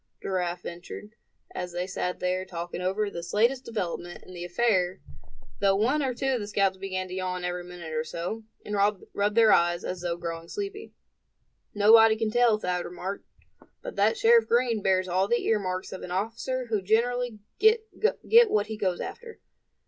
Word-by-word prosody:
Giraffe 180 Hz, -2 st, -2 dB
ventured, 175 Hz, +4 st, -8 dB, 0.4 s
as 180 Hz, -1 st, -5 dB
they 175 Hz, +1 st, -2 dB
sat 180 Hz, -1 st, -3 dB
there, 185 Hz, +1 st, 0 dB
talking 175 Hz, -1 st, -6 dB
over 195 Hz, +3 st, 0 dB
this 170 Hz, +1 st, -6 dB
latest 245 Hz, +5 st, +2 dB
development 175 Hz, -5 st, -4 dB
in 185 Hz, -, -13 dB
the 175 Hz, -1 st, -6 dB
affair, 185 Hz, -1 st, +1 dB, 0.6 s
though 195 Hz, -1 st, +3 dB
one 245 Hz, +9 st, +2 dB
or 260 Hz, -3 st, -1 dB
two 270 Hz, +2 st, 0 dB
of 250 Hz, -, 0 dB
the 205 Hz, -, -5 dB
scouts 195 Hz, -2 st, +1 dB
began 185 Hz, -1 st, -4 dB
to 180 Hz, -, -8 dB
yawn 185 Hz, -1 st, -3 dB
every 180 Hz, 0 st, -3 dB
minute 175 Hz, -2 st, -8 dB
or 155 Hz, 0 st, 0 dB
so, 175 Hz, +8 st, -5 dB, 0.2 s
and 210 Hz, -, -5 dB, 0.4 s
rub 205 Hz, +1 st, 0 dB
their 225 Hz, -2 st, +6 dB
eyes, 175 Hz, 0 st, +2 dB
as 180 Hz, -1 st, -4 dB
though 175 Hz, -1 st, -2 dB
growing 165 Hz, -1 st, -5 dB
sleepy. 410 Hz, -, -6 dB, 0.8 s
"Nobody 220 Hz, +2 st, +7 dB
can 220 Hz, -1 st, -1 dB
tell," 240 Hz, -2 st, +4 dB
Thad 180 Hz, -3 st, -2 dB
remarked; 185 Hz, +3 st, -6 dB, 0.6 s
"but -, -, -6 dB
that -, -, +2 dB
Sheriff 465 Hz, 0 st, +5 dB
Green 235 Hz, -2 st, +2 dB
bears 185 Hz, -1 st, +2 dB
all 185 Hz, +2 st, +1 dB
the 240 Hz, +3 st, 0 dB
earmarks 185 Hz, -4 st, -1 dB
of 190 Hz, -, -7 dB
an -, -, -7 dB
officer 230 Hz, +7 st, -2 dB
who 215 Hz, -3 st, +1 dB
generally 235 Hz, +3 st, +1 dB, 0.2 s
get 440 Hz, +2 st, +4 dB, 0.6 s
what 205 Hz, -1 st, +2 dB
he 215 Hz, 0 st, -6 dB
goes 185 Hz, -4 st, -1 dB
after." 470 Hz, -1 st, -8 dB
195 Hz, 180 wpm, -27 LUFS, 180-230 Hz, 0.8 s, Nobody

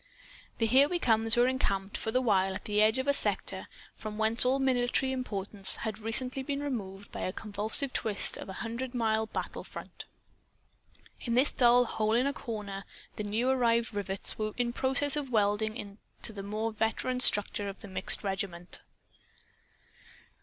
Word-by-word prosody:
The 225 Hz, -, +1 dB
"Here 265 Hz, +6 st, +5 dB
We 355 Hz, -, +1 dB
Comes" 225 Hz, -5 st, +3 dB
were 240 Hz, +1 st, +5 dB
encamped, 200 Hz, -6 st, -1 dB
for -, -, -3 dB
the 255 Hz, +3 st, +1 dB
while, 195 Hz, -4 st, +2 dB
at -, -, -7 dB
the 210 Hz, 0 st, +1 dB
edge 220 Hz, +3 st, +4 dB
of 260 Hz, +1 st, -2 dB
a 280 Hz, -, +4 dB
sector -, -, -1 dB, 0.3 s
from 215 Hz, -1 st, -7 dB
whence 220 Hz, +2 st, +2 dB
all 255 Hz, +2 st, +2 dB
military 260 Hz, 0 st, +1 dB
importance 200 Hz, -6 st, +1 dB
had 220 Hz, -1 st, -3 dB
recently 250 Hz, +4 st, -1 dB
been 280 Hz, +1 st, -3 dB
removed 200 Hz, -8 st, -5 dB
by -, -, -7 dB
a 185 Hz, -, -2 dB
convulsive 215 Hz, +7 st, 0 dB
twist 210 Hz, -3 st, +2 dB
of -, -, -8 dB
a -, -, -5 dB
hundred 245 Hz, +3 st, -5 dB
mile 220 Hz, -2 st, +1 dB
battle -, -, -5 dB
front. -, -, -10 dB, 1.1 s
In 235 Hz, -1 st, -2 dB
this 260 Hz, +4 st, +5 dB
dull 245 Hz, 0 st, +5 dB
hole 220 Hz, -1 st, -1 dB
in 245 Hz, +3 st, +3 dB
a 280 Hz, -, 0 dB
corner 205 Hz, -6 st, -6 dB, 0.3 s
the 210 Hz, -, -4 dB
new 215 Hz, +4 st, -1 dB
arrived 235 Hz, -2 st, +2 dB
rivets 195 Hz, 0 st, +1 dB
were 215 Hz, 0 st, -2 dB
in 240 Hz, -1 st, 0 dB
process 270 Hz, +3 st, +2 dB
of 290 Hz, -3 st, -3 dB
welding 215 Hz, 0 st, +1 dB
into 205 Hz, +2 st, -5 dB
the 200 Hz, -, -6 dB
more 215 Hz, +3 st, -3 dB
veteran 225 Hz, +4 st, -1 dB
structure 205 Hz, -3 st, +2 dB
of 195 Hz, -, -10 dB
the 205 Hz, -, -9 dB
mixed 185 Hz, +2 st, 0 dB
regiment. 190 Hz, -3 st, -3 dB
220 Hz, 175 wpm, -30 LUFS, 205-255 Hz, 1.1 s, Here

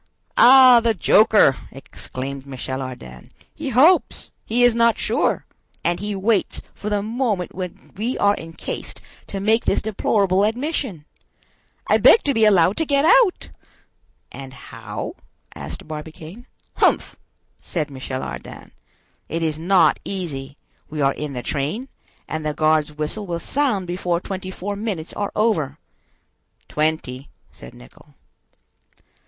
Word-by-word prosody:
"Ah, 255 Hz, -1 st, +8 dB
the 230 Hz, -1 st, +1 dB
joker!" 210 Hz, -6 st, +5 dB, 0.2 s
exclaimed 135 Hz, 0 st, -7 dB
Michel 130 Hz, 0 st, -5 dB
Ardan. 65 Hz, -, -9 dB, 0.2 s
"He 305 Hz, -3 st, -5 dB
hopes!—He 255 Hz, -4 st, +2 dB
is 245 Hz, -1 st, +6 dB
not 235 Hz, 0 st, +3 dB
sure!—and 175 Hz, 0 st, -2 dB
he 205 Hz, +1 st, -3 dB
waits 205 Hz, +2 st, 0 dB
for 210 Hz, -, -6 dB
the 205 Hz, -1 st, 0 dB
moment 220 Hz, -5 st, -2 dB
when 180 Hz, -1 st, -8 dB
we 230 Hz, +6 st, -2 dB
are 205 Hz, 0 st, +3 dB
encased 165 Hz, 0 st, -7 dB, 0.3 s
to 195 Hz, -, -5 dB
make 220 Hz, +4 st, +2 dB
this -, -, +2 dB
deplorable 200 Hz, -2 st, +1 dB
admission! 235 Hz, -, -2 dB, 0.8 s
I -, -, +3 dB
beg 450 Hz, -, +7 dB
to 280 Hz, -, +1 dB
be 225 Hz, -2 st, +3 dB
allowed 190 Hz, -2 st, +4 dB
to 320 Hz, -, 0 dB
get 280 Hz, 0 st, +2 dB
out!" 475 Hz, -2 st, +4 dB, 0.8 s
"And 135 Hz, -1 st, -10 dB
how?" -, -, -7 dB, 0.4 s
asked 75 Hz, -, -8 dB
Barbicane. 160 Hz, +7 st, -9 dB, 0.3 s
"Humph!" -, -, +2 dB, 0.5 s
said 155 Hz, -4 st, -3 dB
Michel 130 Hz, -1 st, -5 dB
Ardan, -, -, -8 dB, 0.6 s
"it 165 Hz, +1 st, -2 dB
is 155 Hz, -1 st, -1 dB
not 185 Hz, +3 st, +3 dB
easy; 150 Hz, -8 st, -5 dB, 0.3 s
we 150 Hz, -, -6 dB
are 135 Hz, 0 st, +3 dB
in 150 Hz, -1 st, -5 dB
the 125 Hz, -1 st, -5 dB
train, 155 Hz, -, -3 dB, 0.4 s
and 155 Hz, 0 st, -4 dB
the 150 Hz, -1 st, -2 dB
guard's 155 Hz, -1 st, +2 dB
whistle 155 Hz, +8 st, -4 dB
will 170 Hz, -1 st, -2 dB
sound 255 Hz, -5 st, 0 dB
before 175 Hz, -1 st, -1 dB
twenty 185 Hz, 0 st, -6 dB
four 195 Hz, +2 st, -5 dB
minutes 200 Hz, -6 st, -4 dB
are 205 Hz, -1 st, -3 dB
over." 160 Hz, -11 st, 0 dB, 0.9 s
"Twenty," 150 Hz, -4 st, -2 dB, 0.2 s
said 60 Hz, -, -13 dB
Nicholl. -, -, -18 dB
185 Hz, 135 wpm, -21 LUFS, 150-220 Hz, 0.9 s, Ah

